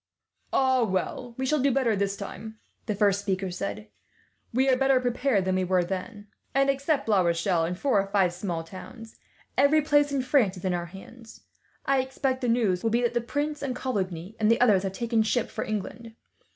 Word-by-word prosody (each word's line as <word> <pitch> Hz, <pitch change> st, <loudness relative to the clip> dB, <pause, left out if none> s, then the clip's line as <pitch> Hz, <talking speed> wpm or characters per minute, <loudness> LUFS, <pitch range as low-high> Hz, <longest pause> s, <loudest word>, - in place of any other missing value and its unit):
"Ah, 260 Hz, -1 st, +3 dB
well, 230 Hz, +4 st, -2 dB
we 265 Hz, -, -2 dB
shall 300 Hz, +3 st, +1 dB
do 275 Hz, +1 st, +3 dB
better 240 Hz, -4 st, +2 dB
this 200 Hz, 0 st, -1 dB
time," 220 Hz, +2 st, -8 dB, 0.3 s
the 210 Hz, -, -1 dB
first 200 Hz, -1 st, +2 dB
speaker 190 Hz, -2 st, -2 dB
said. 205 Hz, +4 st, -5 dB, 0.6 s
"We 260 Hz, +3 st, +2 dB
are 260 Hz, -, +5 dB
better 270 Hz, 0 st, +3 dB
prepared 245 Hz, -4 st, 0 dB
than 185 Hz, -, +1 dB
we 185 Hz, 0 st, +1 dB
were 185 Hz, 0 st, +2 dB
then 195 Hz, +4 st, -5 dB, 0.3 s
and, 275 Hz, 0 st, +4 dB
except 280 Hz, 0 st, -1 dB
La 205 Hz, -4 st, +4 dB
Rochelle 170 Hz, 0 st, +1 dB
and 180 Hz, +2 st, -3 dB
four 255 Hz, -3 st, +2 dB
or 195 Hz, -, -6 dB
five 195 Hz, -3 st, +2 dB
small 175 Hz, -2 st, -4 dB
towns, 220 Hz, +6 st, -11 dB, 0.4 s
every 290 Hz, +2 st, +4 dB
place 290 Hz, -1 st, +3 dB
in 275 Hz, -2 st, 0 dB
France 245 Hz, -8 st, +2 dB
is 180 Hz, -, -8 dB
in 185 Hz, -, +1 dB
our 175 Hz, -1 st, -3 dB
hands. 220 Hz, +6 st, -13 dB, 0.4 s
I 275 Hz, -1 st, +2 dB
expect 260 Hz, 0 st, -2 dB
the 250 Hz, -, -1 dB
next 230 Hz, -, +4 dB
news 185 Hz, -6 st, 0 dB
will 225 Hz, -, +2 dB
be 235 Hz, +2 st, +1 dB
that 240 Hz, -, +1 dB
the 240 Hz, -, +1 dB
prince 290 Hz, +5 st, -3 dB
and 265 Hz, -3 st, -3 dB
Coligny, 190 Hz, -6 st, -3 dB
and 215 Hz, -1 st, +3 dB
the 230 Hz, -, +4 dB
others, 210 Hz, -6 st, +4 dB
have 190 Hz, -1 st, -3 dB
taken 230 Hz, +1 st, 0 dB
ship 220 Hz, +2 st, 0 dB
for -, -, -3 dB
England. 225 Hz, +2 st, -5 dB
225 Hz, 210 wpm, -26 LUFS, 190-260 Hz, 0.6 s, are